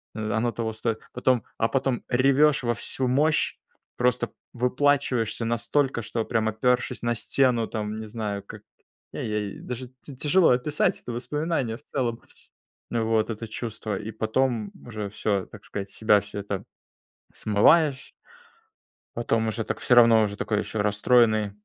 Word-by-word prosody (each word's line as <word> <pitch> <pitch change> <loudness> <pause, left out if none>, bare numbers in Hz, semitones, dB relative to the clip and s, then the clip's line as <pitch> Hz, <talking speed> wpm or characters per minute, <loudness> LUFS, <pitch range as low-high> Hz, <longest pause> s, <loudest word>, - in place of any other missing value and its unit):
э, 110 -1 -3
оно 120 +1 +1
того 115 -1 -3
стоит. 110 0 -2
Потом 125 -1 +1
а 115 - +2
потом 135 -2 0
ревешь 140 +4 +4
во 120 0 +1
всю 130 +4 -3
мощь, 150 +5 +2 0.4
просто 125 0 +1 0.2
выплакиваешься 125 -2 +1
настолько, 120 +3 0
что 115 +2 -2
прям 110 -1 0
опёршись 125 +3 0
на 120 0 0
стену, 120 0 +2
там, 110 -1 -4
не 110 - -6
знаю, 105 -2 -4
как - - -11 0.5
я - - -4
ей 105 -2 -3
даже 125 0 -6
тя 140 - -10
тяжело 160 +7 +4
описать 135 +5 +1
это - - -6
воспоминание 135 -1 -2
в 140 - -22
целом 120 -5 -2 0.7
вот, 115 -1 +1
это 115 0 -5
чувство. 110 -2 -4
И 105 +1 -6
потом 110 0 0
уже 105 -3 -5
всё, 100 -2 -1
так - - -14
сказать, 100 -1 -5
с - - -6
себя 105 -2 +4
всё 100 0 -7
это 100 -1 -4 0.7
смываешь. 135 +7 +3 1.1
Потом 115 -1 0
уже 110 +1 -2
так - - -4
всё 125 - +2
равно, 115 -2 +7
уже 100 -1 -2
такой 105 -1 -1
еще 105 0 -2
расстроенный 110 0 +3
115 Hz, 155 wpm, -25 LUFS, 110-125 Hz, 1.1 s, равно